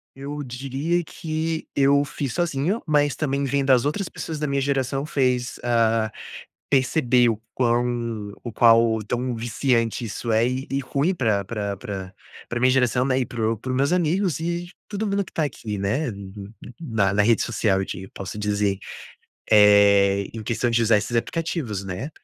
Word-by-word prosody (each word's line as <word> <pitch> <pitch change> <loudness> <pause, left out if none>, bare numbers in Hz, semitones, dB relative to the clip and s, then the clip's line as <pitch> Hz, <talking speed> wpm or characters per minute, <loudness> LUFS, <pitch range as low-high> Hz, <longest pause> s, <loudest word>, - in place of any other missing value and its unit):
Eu 145 +2 -6
diria 135 +7 -2
que 160 0 -4
eu 140 +1 +4
fiz 140 -3 -4
sozinho, 175 +4 0
mas 145 -2 +2
também 140 -2 -1
vem 140 +1 0
das 130 -2 +4
outras 180 +5 -1
pessoas 160 -2 -6
da 150 - -1
minha 140 0 0
geração, 135 0 -1
fez 125 -4 0
ah, 115 -2 +2 0.6
perceber 125 -2 +3
o 110 -2 -1
quão 120 -3 -1
o 120 - -6
qual 115 -1 +5
tão 125 +3 -2
viciante 115 0 0
isso 115 +1 -3
é, 115 +2 +3
e 130 +1 -3
e 135 - 0
ruim 140 +7 0
pra 110 - 0
pra 100 -1 -3
pra 95 -1 -6 0.4
pra 120 - -3
minha 130 +1 +4
geração, 125 -1 +2
né, 130 -1 +1
e 125 - -1
para 115 -1 -1
o - - -3
para 130 - -6
os 130 - 0
meus 140 +4 +2
amigos 180 -1 +1
e 170 +1 -3 0.2
todo 210 +1 -3
mundo 200 0 0
que - - -16
tá 160 - 0
aqui, 110 -6 -5
né, 105 +10 -1
no 100 -2 -9
no 100 +1 -10 0.3
na 110 - 0
na 105 +1 +3
rede 115 +2 +3
social 110 -4 +1
eu - - -1
di 95 0 -7
posso 100 +1 -6
dizer, 105 -1 0 0.7
eh, 100 -1 +6
em 115 - -6
questão 115 +3 -1
de 115 0 +2
usar 115 -1 +4
esses 105 +3 -3
aplicativos, 125 - -2
né, 95 +9 -5
125 Hz, 185 wpm, -23 LUFS, 110-140 Hz, 0.7 s, eh